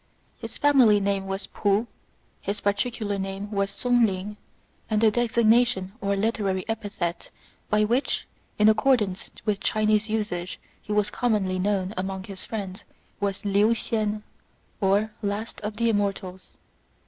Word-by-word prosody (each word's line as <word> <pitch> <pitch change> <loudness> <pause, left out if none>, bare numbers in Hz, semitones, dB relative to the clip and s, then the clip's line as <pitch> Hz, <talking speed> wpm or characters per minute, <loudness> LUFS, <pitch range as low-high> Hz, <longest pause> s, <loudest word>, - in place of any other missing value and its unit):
His - - -7
family 260 -8 +5
name 195 -1 0
was 195 0 -3
P'u; 205 +2 +1 0.6
his 200 +1 -3
particular 205 0 -1
name 195 +2 -4
was 200 -1 0
Sung 245 +4 +2
ling; 200 +2 -4 0.5
and 215 -1 +2
the 220 0 +5
designation 230 -3 +3
or 200 0 +1
literary 195 -3 0
epithet 205 -6 -3 0.4
by 210 0 +3
which, 240 +6 +1 0.3
in 210 - +5
accordance 215 -3 +2 0.2
with 210 -2 +1
Chinese 215 +1 +2
usage, 205 -5 -2 0.2
he - - -8
was 210 -1 +2
commonly 200 -6 0
known 195 0 0
among 190 0 -3
his 195 -1 -8
friends, 195 -4 -5 0.4
was 200 0 -2
Liu 205 +3 +4
hsien, 215 -2 -1 0.6
or 205 +2 +2
" - - -34
Last 205 +2 -3
of 210 0 -4
the 230 0 +2
Immortals." 195 -3 -3
205 Hz, 140 wpm, -26 LUFS, 195-220 Hz, 0.6 s, family